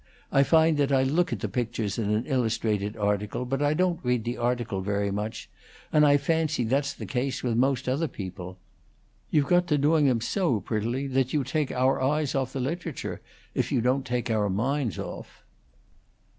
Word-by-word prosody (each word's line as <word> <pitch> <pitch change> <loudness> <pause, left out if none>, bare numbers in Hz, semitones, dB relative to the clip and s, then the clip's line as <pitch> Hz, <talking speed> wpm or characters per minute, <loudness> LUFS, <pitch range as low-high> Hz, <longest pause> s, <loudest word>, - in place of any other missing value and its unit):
I 135 - +5
find 160 +2 +4
that 140 -1 +1
I 135 -1 +4
look 160 +6 +1
at - - -3
the - - -1
pictures 115 -4 -2
in 105 -2 -1
an 105 +3 0
illustrated 110 -5 -1
article, 105 +3 -1
but 135 +2 -2
I 145 +1 +2
don't 180 0 +1
read 125 -2 +1
the 120 +2 -2
article 120 -5 -1
very 100 +1 -1
much, 105 +2 -4 0.5
and 150 - +5
I 145 0 +6
fancy 155 -1 0
that's 140 +5 +1
the - - -7
case 130 0 -2
with 120 -3 0
most 130 +1 +1
other 140 +6 +1
people. 95 -5 -7 0.7
You've 150 -2 +3
got 175 +3 +3
to 150 - +2
doing 150 +1 +3
them 125 -3 +2
so 130 - 0
prettily 115 +7 -2
that 135 -1 0
you 150 -3 +2
take 140 +2 -1
our 130 +1 +1
eyes 145 +2 +1
off 130 -2 -1
the 135 - -3
literature, 160 +3 -4 0.3
if - - -1
you - - +2
don't 130 +3 +1
take 125 -2 -2
our 105 -2 +1
minds 120 - -1
off." - - -8
130 Hz, 190 wpm, -27 LUFS, 110-145 Hz, 0.7 s, I